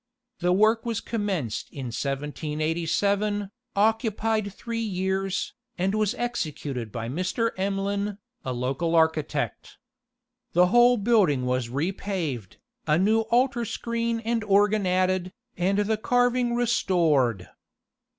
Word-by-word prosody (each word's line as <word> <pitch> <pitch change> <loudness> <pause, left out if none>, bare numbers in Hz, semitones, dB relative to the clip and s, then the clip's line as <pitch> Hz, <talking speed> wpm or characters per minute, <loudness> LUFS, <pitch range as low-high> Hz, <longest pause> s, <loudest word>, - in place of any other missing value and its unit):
The 180 0 +1
work 215 +4 +4
was 230 -2 -2
commenced 195 - -3
in 130 -5 -6
1787, 165 - -1 0.2
occupied 220 0 +1
three 230 +3 -5
years, 190 -2 -1 0.2
and 190 +2 0
was 215 -1 +1
executed 150 - -3
by 115 0 -4
Mr. 185 - -1
Emlyn, 200 +1 -1 0.3
a 130 - -3
local 130 +7 -1
architect. 160 -3 0 0.8
The 180 +1 +5
whole 240 +1 +6
building 200 - +3
was 125 -1 -1
repaved, 155 - -3 0.3
a 150 - +4
new 210 +5 +3
altar 245 0 +2
screen 230 0 -2
and 230 0 -1
organ 205 0 +3
added, 185 0 +1 0.2
and 190 +3 +1
the 210 +1 +1
carving 245 +1 +2
restored. 165 - +2
195 Hz, 110 wpm, -26 LUFS, 155-220 Hz, 0.8 s, whole